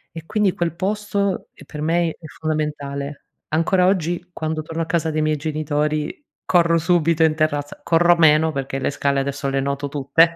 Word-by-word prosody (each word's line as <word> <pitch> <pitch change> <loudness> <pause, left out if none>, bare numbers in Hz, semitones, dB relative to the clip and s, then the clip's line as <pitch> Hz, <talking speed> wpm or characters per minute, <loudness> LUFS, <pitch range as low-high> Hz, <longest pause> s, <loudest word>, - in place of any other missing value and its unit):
E 165 - -6
quindi 205 0 +1
quel 170 -1 -2
posto 200 +1 -1
è - - -15
per 150 -1 -8
me 170 +2 +2
i - - 0
è - - -13 0.2
fondamentale. 145 -2 -3 0.2
Ancora 175 +4 +2
oggi, 175 -1 0
quando 155 -1 -2
torno 160 +1 -5
a - - 0
casa 165 -1 0
dei 155 0 -1
miei 155 0 +1
genitori 150 - -2 0.2
corro 170 -2 +3
subito 165 -1 +2
in 160 - +4
terrazza, 145 -2 -1
corro 170 +1 +4
meno 160 0 +5
perché 135 -1 -3
le - - 0
scale 140 -1 0
adesso 140 0 -3
le 135 0 0
noto 140 +1 -2
tutte. 150 +4 +3
155 Hz, 185 wpm, -21 LUFS, 145-170 Hz, 0.2 s, meno